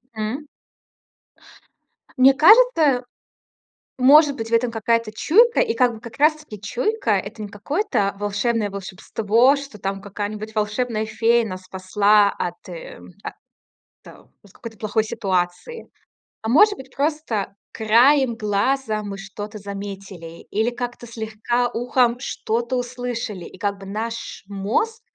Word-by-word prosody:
М. 225 +8 -4 1.7
Мне 265 +1 +7
кажется, 315 - +5 0.9
может 285 +2 +6
быть, 225 -3 -5
в - - -5
этом 230 +1 +2
какая-то 230 0 0
чуйка. 465 - +4
И 460 -2 +1
как 250 -3 +3
бы 220 - -10
как 235 0 -11
раз 305 +2 +5
таки 300 -10 -11
чуйка- 250 - -1
это 205 +2 -2
не - - -5
какое-то 205 - -1
волшебное 205 +1 -1
волшебство, 210 +6 +1
что 275 -6 -8
там 195 0 -4
какая-нибудь 210 +2 -6
волшебная 215 +1 -1
фея 230 +2 +2
нас 185 -2 -6
спасла 200 +2 +3
от, 175 +1 -6
э, 170 -2 -9 0.3
о - - -5 0.7
тэ - - -13 0.3
от 200 - -20
какой-то 230 -2 -10
плохой 215 0 0
ситуации, 195 - -3 0.5
а 220 - -4
может 405 - +6
быть, 265 0 -13
просто 285 -10 -2 0.2
краем 240 +4 +4
глаза 215 +2 0
мы 200 -1 -5
что-то 205 +2 -8
заметили 195 -4 -8
или 220 +3 +1
как-то 240 0 -6
слегка 230 +2 -2
ухом 245 0 +1
что-то 235 -1 -3
услышали, 245 -6 -4
и - - -11
как 200 0 -2
бы 195 - -11
наш 225 +3 -5
мозг 215 - -1
225 Hz, 135 wpm, -22 LUFS, 205-255 Hz, 1.7 s, Мне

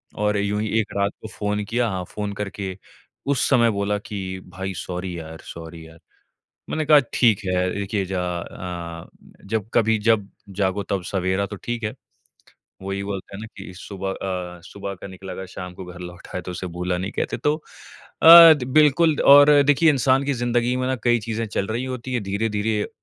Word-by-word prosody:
और 105 0 0
यूँ 100 +1 0
ही 110 - -2
एक 110 - -3
रात 100 +1 +1
को - - -7
फ़ोन 105 -1 -2
किया 120 +3 0
हाँ, 95 -2 -3
फ़ोन 105 +2 -5
करके 100 -2 -5 0.6
उस - - 0
समय 120 -4 +4
बोला 100 0 -1
कि, 95 -3 -6
"भाई, 95 +1 -5
सॉरी 90 0 -5
यार! 80 0 -9
सॉरी 80 0 -9
यार।" 80 0 -16 0.7
मैंने 155 0 -1
कहा, 150 -1 +8 0.2
"ठीक 115 -5 +4
है।" 90 0 +1
देखिए 100 0 -2
ज - - -2
अ, 85 -1 -5 0.4
जब 110 0 -2
कभी 110 -1 +3
जब 105 -3 +2 0.3
जागो 95 +1 +1
तब 100 -2 0
सवेरा, 95 +1 0
तो 100 - -8
ठीक 120 +3 -5
है। 105 - -2 0.9
वो 95 +1 -5
ही 100 0 -3
बोलते 100 -1 -6
हैं 100 - -8
ना 110 - -7
कि 95 -1 -9
सुबह 95 0 -5
अ, 90 -3 -5
सुबह 100 0 -6
का 90 - -10
निकला 95 0 -9
अगर 95 - -6
शाम 90 -1 -8
को 90 0 -9
घर 90 0 -10
लौट 90 +1 -10
आए 90 - -2
तो 90 - -7
उसे 90 +1 -5
भूला 90 0 -1
नहीं 95 +4 -4
कहते। - - -2
तो 150 +1 +1 0.7
अ, 165 0 +11
बिल्कुल 150 +4 +4
और 145 +1 +9
देखिए 145 +3 +4
इंसान 135 -1 +3
की 140 - 0
ज़िंदगी 120 0 0
में 130 - -1
ना 130 - 0
कई 120 -1 +3
चीज़ें 115 +1 -3
चल 100 -1 -2
रही 120 +4 -2
होती 130 0 -5
है। 125 - +1
धीरे-धीरे 105 +1 -1
100 Hz, 195 wpm, -23 LUFS, 95-115 Hz, 0.9 s, अ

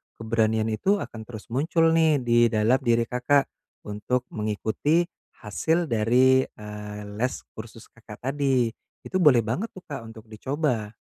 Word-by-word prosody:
keberanian 110 0 0
itu 190 - +2
akan 110 - -7
terus 110 -1 -10
muncul 165 +5 +2
nih 160 -5 +3
di 120 0 +4
dalam 115 +4 +2
diri 120 -3 +2
Kakak, 125 +4 +1 0.3
untuk 105 +5 -2
mengikuti 110 +10 0 0.4
hasil 160 +11 0
dari, 125 +4 +4
eee, 105 0 -8 0.2
les 125 +2 0 0.2
kursus 110 +1 -11
Kakak 110 -1 -13
tadi. 135 -5 +1 0.3
Itu 185 - -2
boleh 140 -9 +5
banget 120 - -2
tuh 185 - -11
Kak 135 -6 -7
untuk 110 -1 -11
dicoba. 120 -3 -2
120 Hz, 140 wpm, -25 LUFS, 110-140 Hz, 0.4 s, boleh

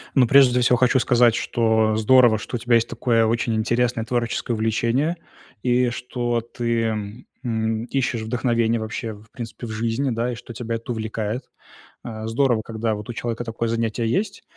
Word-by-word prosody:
Ну, 130 -3 +5
прежде 125 -1 +6
всего 125 0 +4
хочу 130 +2 +3
сказать, 120 -2 +4
что 110 -2 +1
здорово, 115 +1 +5
что 105 +4 -5
у - - -9
тебя 120 +1 +2
есть 115 0 +3
такое 115 -1 +1
очень 115 0 0
интересное 120 +1 0
творческое 120 0 -1
увлечение, 115 +9 0 0.5
и 125 0 +2
что 120 0 -2
ты, 115 -2 -2 0.2
м, 110 -1 -1
ищешь 130 -2 -1
вдохновения 115 0 0
вообще, 110 +1 -4
в 105 +1 -16
принципе, 120 0 -7
в 110 - -6
жизни, 115 +5 -1
да, 120 +2 -1
и - - -4
что 120 0 -10
тебя 115 0 -4
это 115 +2 -5
увлекает. 110 +1 -4 0.5
Э, 110 -2 -6
здорово, 120 0 +2
когда 110 -1 -2
вот 105 -1 -8
у - - -3
человека 120 0 -3
такое 115 0 -3
занятие 115 0 -1
есть, 195 - -1
115 Hz, 175 wpm, -22 LUFS, 110-125 Hz, 0.5 s, прежде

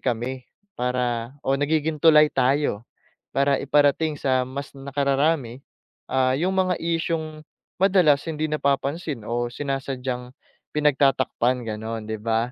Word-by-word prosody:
kami 125 +1 -3 0.3
para 125 0 -1
o 135 - +1
nagiging 155 +1 0
tulay 155 -1 +6
tayo, 130 -4 +1 0.4
para 140 0 +2
iparating 145 +2 +2
sa 130 -1 +1
mas 140 +3 -7
nakararami, 140 -1 0 0.5
ah, 130 -1 +2
'yong 175 +7 0
mga 185 -1 +1
isyung 160 -2 -2 0.4
madalas 180 -7 +4
hindi 155 -1 -2
napapansin 140 -2 -1
o 120 +2 -2
sinasadyang 130 -1 -4 0.4
pinagtatakpan 135 -4 +2
gano'n, 110 0 -5
'di 110 -1 -4
ba? 115 +2 0
135 Hz, 115 wpm, -24 LUFS, 125-150 Hz, 0.5 s, tulay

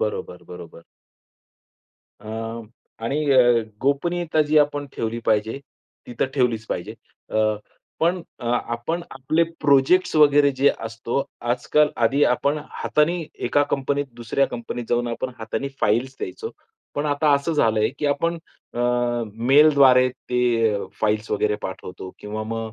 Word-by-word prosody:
बरोबर, 95 -4 -3
बरोबर. 85 -1 -11 1.4
अ, 115 +1 -5 0.4
आणि 135 +6 -1
अ, 130 - +5 0.4
गोपनीयता 160 +4 0
जी 155 - +5
आपण 145 -1 +1
ठेवली 115 +1 -2
पाहिजे, 110 +3 +1 0.5
ती 120 - -9
तर - - +3
ठेवलीच 120 -5 +1
पाहिजे. - - -4 0.4
अ, - - -2 0.6
पण 175 +3 +2 0.2
अ, - - -8
आपण 120 +7 -2
आपले 155 +5 +1 0.2
प्रोजेक्ट्स 140 +7 +3
वगैरे 145 -1 +6
जे 140 - +6 0.2
असतो 115 +4 -2 0.3
आजकाल 150 +4 +2 0.2
आधी 140 +6 +2
आपण 140 +4 +1
हातानी 165 +2 0 0.2
एका 145 - +3
कंपनीत, 140 +1 0 0.2
दुसऱ्या 125 +4 +1
कंपनीत 120 0 -6
जाऊन 120 0 +1
आपण 125 +2 -3
हातानी 110 +5 -3
फाइल्स 125 +6 +1
द्यायचो 445 +1 -5 0.4
पण 145 +1 -1
आता 145 +1 +2
असं 140 +4 -1
झालंय, 110 -7 +2
की 150 - -1
आपण 165 +4 0 0.4
अं, 120 -1 0 0.2
मेलद्वारे 135 -2 +6
ते 125 0 -3 0.3
अ, 100 - -3 0.2
फाइल्स 110 0 0
वगैरे 105 0 +1
पाठवतो 95 0 -7
किंवा 105 +1 -5
मग 115 0 -4
130 Hz, 135 wpm, -23 LUFS, 115-145 Hz, 1.4 s, वगैरे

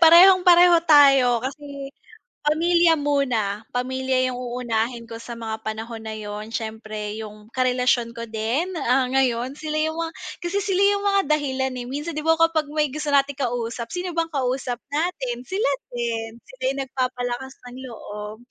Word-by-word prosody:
Parehong-pareho 355 +1 +8
tayo 275 -5 +6
kasi 280 0 -6 0.5
pamilya 330 +2 +3
muna. 255 -9 0
Pamilya 260 0 -1
'yung 250 - -4
uunahin 240 -1 -2
ko 230 0 -9
sa 235 0 -8
mga 220 -1 -5
panahon 220 +1 -5
na 220 -1 -6
yun. 210 +1 -6
Siyempre 220 -2 -5
'yung 210 +1 -11
karelasyon 250 -2 +1
ko 230 - -4
din, 230 +11 -2
ah 255 +1 +3
ngayon, 255 -1 +1
sila 310 +1 -4
'yung 315 +1 +1
mga 330 0 -2 0.3
kasi 350 +3 -2
sila 390 -1 0
'yung 400 0 +3
mga 395 0 +4 0.2
dahilan 265 -2 -2
eh. 245 - -5
Minsan 295 +5 -5
'di 305 - -3
ba 325 - +5
kapag 330 -2 +3
may 300 -2 +1
gusto 295 +1 -3
nating 275 -1 +3
kausap, 235 -3 -3
sino 360 0 -3
bang 330 0 +1
kausap 255 -2 -1
natin? 280 -6 -2
Sila 380 - 0 0.2
din. 230 -1 -3
Sila 260 0 -17
'yung 275 +1 0
nagpapalakas 255 -1 -3 0.2
ng 250 - -11
loob. 210 -3 -8
260 Hz, 160 wpm, -23 LUFS, 235-305 Hz, 0.5 s, Parehong-pareho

